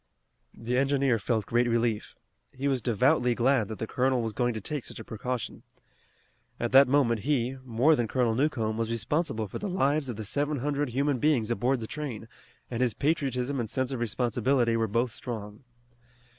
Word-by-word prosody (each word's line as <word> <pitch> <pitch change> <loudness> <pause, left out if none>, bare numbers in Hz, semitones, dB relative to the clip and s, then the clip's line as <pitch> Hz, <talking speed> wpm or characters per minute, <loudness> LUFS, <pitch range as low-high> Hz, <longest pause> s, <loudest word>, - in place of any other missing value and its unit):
The 120 +2 -1
engineer 135 -3 +2
felt 110 -1 -1
great 120 +1 +2
relief. 115 -2 0 0.4
He 135 +2 -3
was 135 -3 +1
devoutly 125 +2 +2
glad 125 -3 +2
that 110 - -6
the - - -3
colonel 130 +1 +1
was 110 -1 -3
going 120 +1 0
to - - -3
take 140 +6 -4
such - - -8
a 110 - -7
precaution. 120 +2 -4 1.0
At 120 - -1
that 135 +1 +8
moment 125 -4 +3
he, 130 0 0
more 130 +6 +3
than 120 -5 0
Colonel 120 -1 +1
Newcomb, 115 -4 0
was 115 -1 -1
responsible 115 0 -1
for - - -6
the 205 - -3
lives 150 -5 +1
of 120 - -3
the 110 0 -6
seven 145 +7 -1
hundred 145 +1 -1
human 135 +2 0
beings 120 -6 +2
aboard 120 +3 +1
the - - -3
train, 130 -5 -6 0.4
and 120 0 -2
his 120 -4 +1
patriotism 140 -2 0
and 115 -3 -2
sense 130 +1 -1
of 130 - -3
responsibility 120 +1 +1
were 115 -1 +1
both 115 +3 0
strong. 110 -2 -7
125 Hz, 185 wpm, -28 LUFS, 115-140 Hz, 1.0 s, that